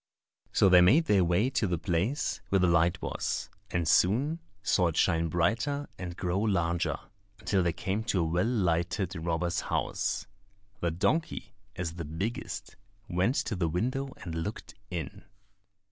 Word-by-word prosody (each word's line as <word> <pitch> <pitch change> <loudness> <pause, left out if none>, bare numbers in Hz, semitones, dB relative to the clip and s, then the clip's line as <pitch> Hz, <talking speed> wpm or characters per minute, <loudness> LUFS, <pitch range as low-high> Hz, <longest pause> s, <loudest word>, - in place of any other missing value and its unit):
So - - +4
they 90 -1 +8
made 135 - +6
their 100 - +4
way 90 +9 +2
to 115 -5 +1
the 90 -1 0
place 100 - -1
where 100 - +3
the 90 - +3
light 85 0 +3
was, - - -3 0.2
and 85 -3 -1
soon 130 - +3 0.2
saw 90 -1 +3
it 80 - -2
shine 85 -2 +3
brighter 115 - 0
and 90 -1 -6
grow 90 +2 0
larger, 85 -5 +1 0.4
until 100 -2 +1
they 85 -1 +2
came 95 +6 -2
to 100 -6 +1
a - - +2
well 85 +3 +1
lighted 90 -3 0
robber's 85 +1 -1
house. - - -1 0.5
The 85 - 0
donkey, 105 - -1 0.2
as 85 -2 -4
the 85 - -4
biggest, 100 - -4 0.3
went 95 +8 +1
to 110 - -2
the 90 -3 0
window 130 - -1
and 85 - -5
looked 80 +6 -5 0.2
in. 85 -4 -5
90 Hz, 160 wpm, -29 LUFS, 85-110 Hz, 0.5 s, they